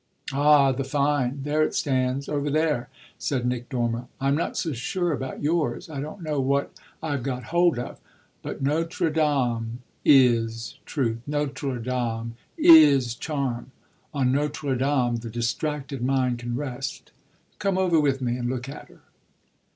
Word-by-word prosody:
"Ah 145 -1 +5
the 135 +1 -2
fine 140 -1 0
there 150 +2 +1
it 155 - +1
stands, 130 0 0
over 145 -1 -1
there!" 150 -4 0 0.3
said 130 -4 -1
Nick 125 -1 -2
Dormer. 120 -2 -1
"I'm 135 +1 +2
not 155 - -1
so 160 - -1
sure 175 +8 -1
about 130 +1 -5
yours 160 +1 0
I 140 -3 -4
don't 155 +5 -7
know 150 -3 -1
what 140 +1 0 0.3
I've 145 -4 -1
got 125 -1 -3
hold 175 -4 +4
of. 120 - -6 0.4
But - - -6
Notre 165 +3 0
Dame 125 -6 0 0.2
is 115 -4 +3
truth; 115 -6 -1
Notre 145 -2 -2
Dame 115 -1 -2 0.2
is 145 -7 +7
charm; 130 -3 -3 0.4
on 135 -3 +1
Notre 145 0 -1
Dame 130 -2 +1
the 115 0 -7
distracted 135 +4 -2
mind 130 -1 +1
can 120 0 -4
rest. 135 -1 -5 0.5
Come 195 +1 0
over 180 -4 +3
with 135 -3 +1
me 120 0 0
and 120 -1 -2
look 130 0 -3
at 140 - -9
her!" - - -19
135 Hz, 150 wpm, -25 LUFS, 125-150 Hz, 0.5 s, is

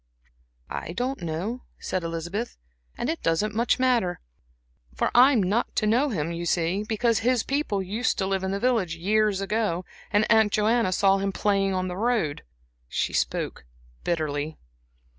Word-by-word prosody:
"I 170 - -4
don't 255 +4 -2
know," 175 +9 -3 0.2
said 185 -2 -3
Elizabeth, 170 +7 -4 0.4
"and - - -2
it 320 +2 -2
doesn't 165 +6 +1
much 235 +3 +2
matter. 245 -9 +1 0.9
I 255 +3 +7
am 230 -8 +3
not 205 +6 0
to 215 - +1
know 245 +7 +3
him, 170 - -2
you 170 0 -4
see, 175 +4 +1
because 225 +1 +1
his 245 0 +2
people 270 -9 -1
used 215 +7 -1
to 190 - 0
live 190 0 -1
in 190 - -1
the 200 +1 -1
village 220 -8 +1
years 205 +3 +1
ago, 195 -3 -1 0.2
and 210 0 +3
Aunt 220 -2 +5
Joanna 215 -1 +2
saw 195 +1 +3
him 195 0 -1
playing 195 -1 +1
on 185 0 -1
the 180 - -4
road." 220 -9 0 0.5
She - - -1
spoke - - -1 0.4
bitterly. 155 -2 -2
200 Hz, 160 wpm, -26 LUFS, 180-230 Hz, 0.9 s, I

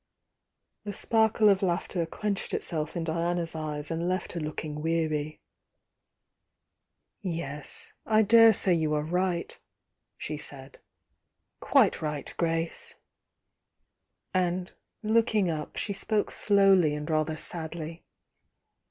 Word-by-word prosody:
^ - - -53 0.8
The 205 -1 -5
sparkle 220 0 +3
of 200 -1 +5
laughter 175 -2 -1
quenched 205 +3 -2
itself 155 -1 -3
in 170 - -1
Diana 170 +2 0
s 165 - -8
eyes 150 -1 -4
and 165 +2 -1
left 185 0 -2
her 170 - -4
looking 150 -1 -4
weary.., 155 -2 -1 0.8
„.. - - -55 1.0
"Yes— 165 -7 -5
I 220 0 +5
daresay 225 -3 +6
you 155 -2 +1
are 150 - 0
right, 180 +1 -1 0.6
she 150 - -4
said— 135 -2 -8 0.8
quite - - +3
right, 150 -2 -4
Grace!" 165 -1 -2 1.4
And 180 0 0 0.3
looking 215 -4 +2
up, 155 -1 -5
she 205 - -2
spoke 210 +2 0
slowly 195 -6 +4
and 150 0 -5
rather 155 -1 0
sadly. 165 0 -5
170 Hz, 115 wpm, -28 LUFS, 155-195 Hz, 1.4 s, daresay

